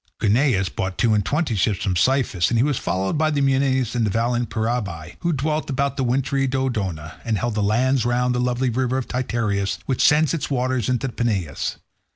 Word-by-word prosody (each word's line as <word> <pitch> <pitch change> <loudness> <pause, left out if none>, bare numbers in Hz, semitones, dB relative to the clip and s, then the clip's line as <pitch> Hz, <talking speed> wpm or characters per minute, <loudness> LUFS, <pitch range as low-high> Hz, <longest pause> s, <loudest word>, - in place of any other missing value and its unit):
Guneus 110 -2 +2
brought 95 +1 -4
two 115 -3 +3
and 105 -1 +2
twenty 150 - 0
ships 100 -1 0
from 95 - 0
Cyphus, 100 -2 +2
and 115 - +1
he 115 - +4
was 145 -3 0
followed 95 +10 -1
by 155 0 +3
the 150 -2 0
Enienes 135 -3 +1
and 120 -2 0
the 105 - +1
valiant 120 +3 0
Peraebi, 110 -8 -3
who 170 - 0
dwelt 150 +1 -1
about 140 0 -1
wintry 135 +2 +1
Dodona, 105 - -3
and 110 -2 0
held 120 +3 -1
the 105 - -1
lands 120 +5 +2
round 125 +1 +1
the 125 - -1
lovely 125 +1 0
river 130 +2 0
Titaresius, 110 -6 -1
which 130 - -1
sends 155 +1 +4
its 165 - -2
waters 130 -4 0
into 125 +1 0
the 125 - -4
Peneus. 100 - -2
125 Hz, 195 wpm, -22 LUFS, 105-135 Hz, -, he